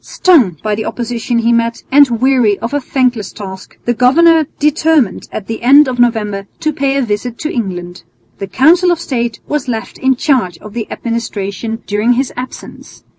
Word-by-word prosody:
Stung 260 - +3
by 215 -1 -1
the 215 +1 -3
opposition 240 0 -3
he 235 0 +2
met 230 0 -1
and 285 0 +6
weary 250 -5 +3
of 230 +4 -5
a 290 - 0
thankless 250 -6 -1
task, 190 -3 -10
the 240 - +1
governor 315 +6 +4
determined 300 - +1
at 210 - -6
the 225 +1 -5
end 280 +4 +6
of 250 -1 -3
November 210 -4 0
to 310 -1 -1
pay 275 0 0
a 275 - +1
visit 230 +2 -3
to 310 - -4
England. 180 -5 -4 0.4
The 195 - -4
Council 330 - +4
of 345 -2 +1
State 240 -7 -3
was 295 -3 -3
left 225 -2 -5
in 265 0 +2
charge 245 - 0
of 210 +4 -12
the 225 -2 -5
administration 225 -1 -4
during 210 +4 +1
his 260 +2 -1
absence. 250 +1 -9
240 Hz, 180 wpm, -14 LUFS, 215-275 Hz, 0.4 s, and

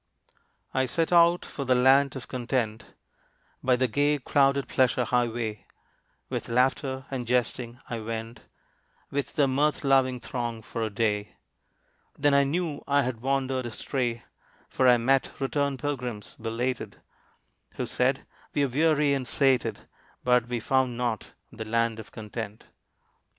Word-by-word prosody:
I 130 0 +1
set 165 +6 0
out 170 0 +5
for 140 - -5
the 130 -1 +3
Land 135 +2 +4
of 130 - -7
Content, 120 -3 -3 0.7
By 130 -1 +3
the 130 +1 +1
gay 145 +5 +2
crowded 140 0 +2
pleasure 125 -1 +2
highway, 115 -3 -1 0.6
With - - -4
laughter, 130 +2 +1
and 125 -3 -3
jesting, 120 0 -1
I 115 - -4
went 115 +1 -5 0.7
With 140 0 -2
the 145 -2 +4
mirth 145 +4 +1
loving 135 -2 +3
throng 120 -2 -4
for 115 - -5
a 110 - 0
day; 105 -1 -1 0.8
Then 145 -1 +3
I 140 0 +5
knew 155 0 -2
I 140 0 +3
had 120 -3 -3
wandered 130 -1 0
astray, 120 0 -2 0.5
For 130 - +2
I 125 -1 +7
met 130 +3 +1
returned 140 0 0
pilgrims, 125 -8 -4
belated, 115 +3 -3 0.7
Who - - -3
said, - - 0 0.3
"We 145 - +3
are - - -3
weary 150 +1 +3
and 135 -3 -2
sated, 135 -1 +2 0.4
But 125 -1 +3
we 120 -1 -2
found 130 +1 +1
not 120 -4 -2 0.2
the 110 - -7
Land 115 0 0
of 110 - -10
Content." 110 0 -7
125 Hz, 145 wpm, -27 LUFS, 115-140 Hz, 0.8 s, I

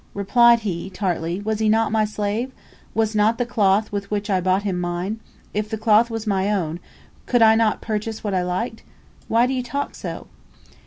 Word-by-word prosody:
Replied 235 +4 +5
he, 190 -3 -4
tartly, 180 -2 -2
"Was 215 +1 -2
he 220 -1 +2
not 220 0 +2
my 215 -1 +2
slave? 210 +4 -2 0.4
Was 220 0 +1
not 215 +2 +3
the 245 - 0
cloth 210 -2 +2
with 200 -1 -4
which 205 0 -2
I 185 -1 +2
bought 185 +2 +1
him 190 -3 -1
mine? 175 +5 -3 0.3
If 210 +1 -2
the 220 - -3
cloth 220 +1 +4
was 225 -1 -4
my 200 -1 +1
own, 170 -5 -1 0.5
could 245 -2 +4
I 220 0 +7
not 225 -1 +2
purchase 220 0 -4
what 205 -2 -2
I 185 - +1
liked? 185 +6 -3 0.5
Why 230 +2 +3
do 260 - -1
you 255 - -1
talk 280 +4 -4
so?" - - -7
210 Hz, 200 wpm, -22 LUFS, 195-225 Hz, 0.5 s, I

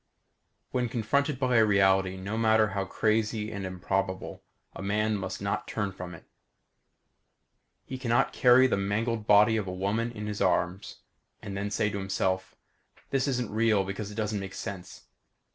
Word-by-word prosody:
When 125 -2 0
confronted 135 +5 0
by 125 -2 +2
a 110 - +6
reality 95 -2 +3
no 100 +3 -4
matter 110 -1 +3
how 100 -1 -2
crazy 110 +2 0
and 100 -3 -4
improbable, 95 +1 -3 0.3
a - - -7
man 105 +2 0
must 95 0 -5
not 105 +1 -2
turn 105 -3 -2
from 90 -2 -8
it. - - -15 1.6
He 130 0 -6
can 125 -3 -4
not 120 - +2
carry 125 +1 +6
the 130 - +2
mangled 105 +3 -1
body 105 +2 +6
of 105 -3 -2
a - - -3
woman 100 +6 -1
in 105 -2 -6
his 105 -1 -4
arms 90 0 0 0.4
and 100 - -6
then 100 +1 -2
say 105 +1 0
to 100 - -3
himself: 95 -1 -1 0.6
_This 135 +1 +2
isn't 125 -4 -1
real 110 -2 +2
because 100 +2 -5
it 105 - -9
doesn't 105 -1 -1
make 95 -1 -7
sense. 95 -3 -7
105 Hz, 170 wpm, -28 LUFS, 95-115 Hz, 1.6 s, a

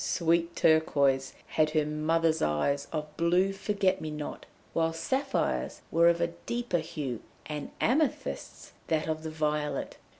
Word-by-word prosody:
Sweet 170 0 +1
Turquoise 140 -4 +3
had 155 -1 +2
her 155 - +3
mother's 160 +2 +1
eyes 140 - +1
of 150 -1 -4
blue 180 +3 +3
forget 195 -1 0
me 155 - -4
not, 150 -1 -6 0.3
while 165 0 +1
Sapphire's 265 - -1
were 170 +1 +6
of 170 0 +2 0.2
deeper 235 -7 0
hue, 140 -7 -4 0.2
and 150 -1 -5
Amethyst's 290 +4 -1 0.2
that 160 -1 0
of 155 0 -1
the 160 - -4
violet. 150 -1 -2
160 Hz, 135 wpm, -29 LUFS, 150-170 Hz, 0.3 s, were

